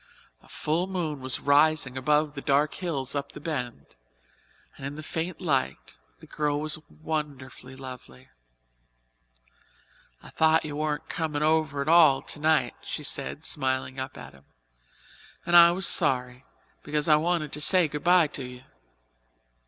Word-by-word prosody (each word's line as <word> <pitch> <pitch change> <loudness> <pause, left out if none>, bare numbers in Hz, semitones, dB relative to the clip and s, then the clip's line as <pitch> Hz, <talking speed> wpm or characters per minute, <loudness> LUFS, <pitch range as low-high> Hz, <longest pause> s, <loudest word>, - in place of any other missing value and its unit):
A - - -22
full 165 +4 -1
moon 170 -6 -3
was 130 0 -2
rising 145 -2 +3
above 150 +3 +1
the 140 - -7
dark 145 +3 +1
hills 140 -7 -3
up 140 -1 -4
the - - -9
Bend 140 -6 -6 0.8
and - - -13
in 140 +1 -5
the 155 - -8
faint 165 +3 -4
light 140 - -2 0.2
the - - -14
girl 150 -1 -2
was 155 0 -2
wonderfully 140 -5 -6
lovely. 125 - -11 1.9
"I - - -13
thought 160 0 +3
you 145 -1 -5
weren't 150 -1 -2
comin' 150 -2 -2
over 155 -2 +1
at - - -12
all 155 -5 +5
tonight," 150 -5 0
she 150 - -6
said, 145 +2 -3
smiling 130 -2 -1
up 130 0 -6
at - - -11
him, 70 +1 -20 1.0
"and 175 0 +2
I 170 0 +10
was 180 +2 0
sorry, 125 0 +1 0.4
because 150 0 -2
I 150 -1 +6
wanted 160 -2 -1
to 150 - -3
say 180 +1 +4
goodbye 170 +4 +3
to 140 - -6
you." 125 0 -10
150 Hz, 150 wpm, -26 LUFS, 135-160 Hz, 1.9 s, I